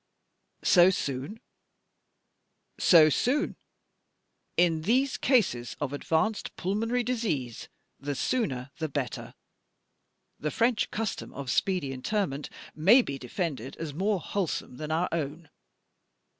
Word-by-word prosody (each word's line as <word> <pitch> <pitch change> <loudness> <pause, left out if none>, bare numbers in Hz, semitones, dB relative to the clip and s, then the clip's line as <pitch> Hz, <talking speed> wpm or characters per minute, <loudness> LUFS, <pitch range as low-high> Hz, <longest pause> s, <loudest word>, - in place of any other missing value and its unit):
"So 180 0 +7
soon?" 140 - -3 1.4
"So 165 -4 +7
soon? 275 - +1 1.0
In 170 -2 +3
these 255 - +1
eases 195 - +2
of 145 -1 -3
advanced 165 +9 -1
pulmonary 225 +6 -1
disease 185 - -2 0.3
the 145 +1 -3
sooner 135 - -1
the 160 -1 -2
better. 140 -3 -4 1.0
The 150 - -1
French 230 +5 +1
custom 220 -1 -3
of 140 -3 -4
speedy 180 -8 0
interment 145 +1 -2 0.2
may 205 +12 +6
be 140 -8 -5
defended 135 - -4
as 160 -3 -5
more 195 +5 0
wholesome 175 -8 -3
than 155 0 -5
our 165 +3 +1
own. 155 0 -4
165 Hz, 110 wpm, -28 LUFS, 140-215 Hz, 1.4 s, So